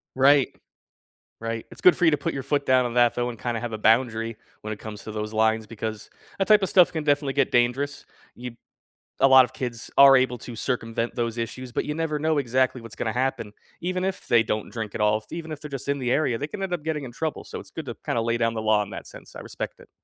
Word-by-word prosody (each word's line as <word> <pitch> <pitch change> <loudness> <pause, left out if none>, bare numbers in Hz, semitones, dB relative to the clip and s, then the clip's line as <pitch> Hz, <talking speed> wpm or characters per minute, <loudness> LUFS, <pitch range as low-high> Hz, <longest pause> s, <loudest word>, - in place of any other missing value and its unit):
Right. 135 +1 +5 0.9
Right, 115 0 -4
it's - - -13
good 180 - +7
for 180 - -3
you 165 - +7
to 150 - +2
put 145 - -3
your 135 - -3
foot 140 +1 -1
down 130 -1 +4
on 120 - -7
that, 120 -1 +4
though, 120 0 -1
and 115 - -7
kinda 120 0 -3
have 120 -1 -5
a 110 - -3
boundary 115 0 +2 0.2
when 110 0 -4
it 105 - -10
comes 105 -2 -8
to 110 - -7
those 105 0 -4
lines, 110 0 +1
because 110 -1 -6 0.3
that 195 - +1
type 210 -2 +6
of 190 - 0
stuff 180 -2 +5
can 160 -2 -3
definitely 145 -2 +1
get 140 -2 +1
dangerous. 125 +4 0 0.3
You 125 -1 -8 0.6
a 135 - +6
lot 130 -1 +8
of 125 - -5
kids 120 -3 -6
are 140 -1 +9
able 130 -1 +2
to 120 - -9
circumvent 115 -1 -2
those 120 -1 -2
issues, 120 +2 -5
but - - 0
you 150 - -3
never 160 -1 -1
know 155 0 +1
exactly 130 -1 +1
what's 115 -2 -11
gonna 110 - -2
happen 125 -4 -2 0.3
even 185 +1 -1
if 190 0 -3
they 120 -2 +6
don't 110 -1 -2
drink 110 -4 -5
at - - -2
all, 105 0 +3
f 110 - -12
even 165 -1 -6
if 150 - -5
they're 150 - -8
just 140 0 -6
in 140 0 0
the 125 -1 -1
area, 140 -7 +1
they 145 - -4
can 195 +4 -6
end 190 - -3
up 175 -4 -2
getting 155 -2 -3
in 125 - -7
trouble, 155 +4 -4
so - - -7
it's - - -13
good - - -6
to - - -5
kinda 115 - 0
lay 115 +1 0
down 115 -1 +1
the 110 - -3
law 110 -1 +3
in 105 - -6
that - - -7
sense, - - -13
I - - -7
respect - - -7
it. - - -17
125 Hz, 270 wpm, -25 LUFS, 115-145 Hz, 0.9 s, are